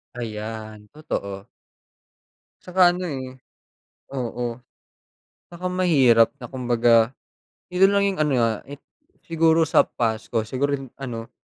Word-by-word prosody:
Ayan, 110 -2 -6
totoo. 100 -9 -5 1.1
Tsaka 180 -1 +4
ano 180 -1 -4
eh. 130 -2 -5 0.8
Oo, 120 -1 -4 0.9
tsaka 180 +1 -4
mahirap 135 -11 +4
na 125 - -8
kumbaga 120 -2 +2 0.6
ito 190 +2 +5
lang 200 0 +2
yong 195 -4 -2
ano, 150 -2 +2
ah, 115 -2 +1
it 145 - -8 0.5
siguro 165 0 +3
sa 160 - +4
past 110 -2 -2
ko 115 -2 -1
siguro 140 +5 -1 0.2
ano, 120 -3 -6
125 Hz, 115 wpm, -23 LUFS, 115-160 Hz, 1.1 s, ito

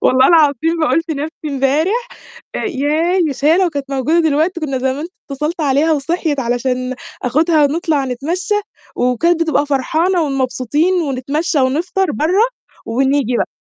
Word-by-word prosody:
والله 260 +1 +4
العظيم 325 0 +3
بقول 310 +1 +2
في 325 -2 -4
نفْسي 305 +2 -5
امبارح 310 - 0 0.5
ياه، 325 +1 0
مش 275 +1 -4
هي 320 +3 +5
لو 370 -2 +2
كانت 280 -3 -5
موجودة 275 +5 +1
دلوقتي 320 +2 +1
كان 275 -4 -2
زمان 265 +4 -2 0.3
اتصلت 300 +5 -3
عليها 290 +2 +2
وصحيِت 310 0 -1
علشان 255 +1 -1 0.3
آخدها 310 +5 +2
ونطلع 300 -1 0
نتمشى، 320 - -2 0.4
وكانت 320 +8 +1
بتبقى 305 -3 +1
فرحانة 325 +6 +1
ومبسوطين 275 +3 0
ونتمشى 290 +3 -1
ونفطر 350 +8 0
برّه، 365 - +2 0.4
ونيجي 265 +1 +1
بقى. - - 0
295 Hz, 135 wpm, -17 LUFS, 270-330 Hz, 0.5 s, هي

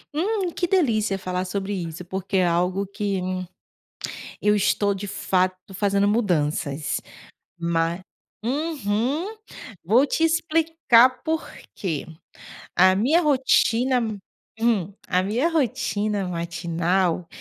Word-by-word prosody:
Hum, 380 +2 0
que 350 - -1
delícia 225 - +2
falar 185 -1 -3
sobre 195 +2 -3
isso, 170 -2 -5
porque 190 +2 -2
é 185 - +4
algo 180 +3 +1
que 200 0 -2 1.2
eu 210 0 +3
estou 200 0 +2
de 200 +1 -5
fato 185 0 -1
fazendo 200 +1 +2
mudanças. 155 - 0 0.6
Mas 170 +1 0 0.4
uhum, 285 - -1 0.5
vou 245 +9 +4
te 325 - 0
explicar 320 -6 +3
por 320 0 -1 0.3
que. 165 -7 -3 0.7
A 185 +1 +6
minha 275 - +3
rotina 260 -3 +3 0.6
hum, 210 -6 +1 0.2
a 180 - +2
minha 230 - +1
rotina 210 - 0
matinal, 170 +1 -1
200 Hz, 105 wpm, -24 LUFS, 180-260 Hz, 1.2 s, A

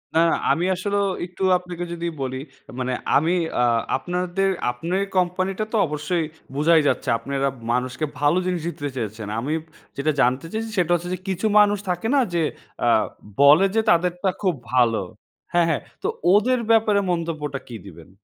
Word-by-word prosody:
না, 160 - +5 0.3
আমি 170 - +1
আসলেও 200 +2 0 0.2
একটু 180 +2 -7
আপনাকে 180 -1 -7
যদি 170 0 -3
বলি, 130 0 -3 0.4
মানে 130 0 -1 0.2
আমি 160 +5 +2 0.3
আ - - +4 0.3
আপনাদের, 180 +5 -1 0.2
আপনের 175 +10 -2
কোম্পানি 185 +1 +1
টা - - +1
তো - - +3
অবশ্যই, 150 +3 -1 0.3
বোঝাই 160 +2 +4
যাচ্ছে। 130 - 0
আপনারা 140 +2 -2 0.2
মানুষকে 130 +4 -1
ভালো 145 +4 +3
জিনিসই 175 -2 -2
দিতে 145 0 -3
চেয়েছেন। 110 -2 -4
আমি 140 +7 -2 0.4
যেটা 145 +3 +1
জানতে 130 +5 +2
চেয়েছি, 225 +1 -3
সেটা 175 -2 +2
হচ্ছে 175 +1 -4
যে, 185 - -4
কিছু 190 +3 -2
মানুষ 205 0 +4
থাকে 180 +4 -1
না? 280 - +5
যে, 170 - +1 0.4
আ - - +2 0.5
বলে 150 +7 +7
যে, 225 - +4
তাদেরটা 180 +2 +1
খুব 185 -5 +1 0.2
ভালো 120 -4 +3 0.5
হ্যাঁ, 175 -1 +4
হ্যাঁ। 155 - 0 0.2
তো - - +1 0.3
ওদের 245 +5 +3
ব্যাপারে, 215 -2 +4
মন্তব্যটা 155 -5 -3
কি 120 - -8
দিবেন? 85 -3 -13
170 Hz, 165 wpm, -23 LUFS, 140-185 Hz, 0.5 s, বলে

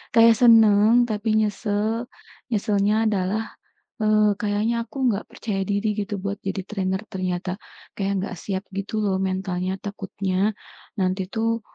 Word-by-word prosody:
Kayak 230 0 +7
seneng 225 0 +6
tapi 215 0 0
nyesel. 215 +2 -1 0.4
Nyeselnya 210 +1 +2
adalah, 205 +2 -1 0.5
eee, 215 -1 +4
kayaknya 215 +3 0
aku 240 - -12
nggak 210 -2 0
percaya 200 -3 -3
diri 205 +1 0
gitu 205 -1 -3
buat 200 +1 -3
jadi 195 0 -2
trainer 190 -1 -2
ternyata. 185 -2 -3 0.4
Kayak 195 0 -1
nggak 180 - -6
siap 190 -1 -3
gitu 200 +2 -3
loh 190 -2 +1
mentalnya. 185 -1 -2
Takutnya 195 0 -2 0.5
nanti 185 0 0
tuh 230 0 0
205 Hz, 135 wpm, -23 LUFS, 190-220 Hz, 0.5 s, Kayak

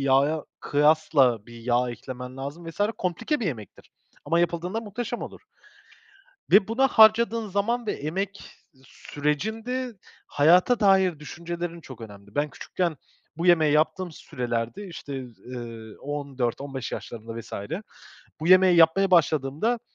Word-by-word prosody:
yağa 140 +3 +2 0.2
kıyasla 145 -6 +3
bir 120 - -13
yağ 120 +1 +1
eklemen 125 +1 -8
lazım 145 +5 -7
vs. 165 - -13 0.2
komplike 225 - -1
bir 220 - -1
yemektir 110 - -7 0.3
ama 165 +4 +2
yapıldığında 175 +5 -1
muhteşem 230 +2 -5
olur - - -8 1.1
ve 195 +1 +6
buna 265 +4 +3
harcadığın 220 0 +5
zaman 220 +5 -1
ve - - +1
emek 190 +7 -4 0.3
sürecinde 220 - -3 0.3
hayata 180 +11 +4
dair 190 -5 +4
düşüncelerin 170 +2 -6
çok 130 -5 -11
önemli. 100 -2 -12
Ben 145 +1 +1
küçükken 170 +3 -3 0.4
bu 170 - -2
yemeği 160 -4 +5
yaptığım 160 +4 +1
sürelerde 125 - -4
işte, 140 -6 -7
z 115 -5 -20
eee, 115 -2 -9
14-15 135 -2 -3
yaşlarında 115 0 -7
vs. 115 +1 -11 0.9
bu 160 - -3
yemeği 185 -1 +6
yapmaya 175 +4 +5
başladığımda 160 - +2
155 Hz, 125 wpm, -25 LUFS, 130-190 Hz, 1.1 s, ve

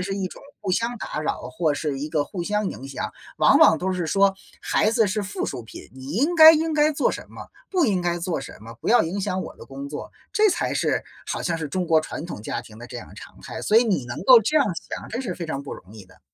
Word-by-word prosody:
是 195 +2 -3
一 195 -2 -2
种 - - -12 0.2
互 195 -3 -3
相 230 +5 0
打 155 - -4
扰 155 - -3
或 155 +2 0
是 145 -2 -3
一 150 +2 -4
个 150 -2 0
互 175 +1 -5
相 210 +1 0
影 135 - -8
响。 135 - -4 0.2
往 - - +5
往 160 - +6
都 185 +1 -1
是 175 -3 -2
说 195 +3 +3 0.3
孩 215 - +2
子 225 -1 +3
是 210 +2 -1
附 200 +1 -4
属 120 - -4
品， 110 - -12
你 130 +2 -8
应 290 - +1
该 320 0 +11
应 320 +1 +1
该 305 0 +3
做 - - +1
什 - - -5
么， - - -10 0.2
不 365 -5 +2
应 195 -6 +1
该 175 0 -1
做 170 -4 -2
什 - - -9
么， 115 +2 -10
不 - - -4
要 240 - +6
影 185 +5 -3
响 185 0 -1
我 - - -9
的 - - -12
工 135 +1 -7
作， 145 - -7 0.2
这 425 0 +4
才 345 - -1
是 - - 0 0.2
好 - - -3
像 170 -2 -1
是 160 - -3
中 185 +4 -1
国 160 -1 +4
传 155 - -6
统 170 -11 -7
家 - - -4
庭 110 0 -14
的 120 - -9
这 125 -1 -8
样 - - -10
常 - - -12
态。 - - -7
所 215 - +2
以 230 - +7
你 190 - 0
能 120 - -6
够 250 -3 +9
这 300 +9 0
样 285 - +5 0.2
想， - - -6
真 240 +4 -3
是 200 -9 -4
非 175 - -6
常 140 -3 -4
不 140 - -7
容 95 +4 -14
易 105 -3 -11
的。 90 - -21
180 Hz, 300 characters per minute, -24 LUFS, 145-220 Hz, 0.3 s, 该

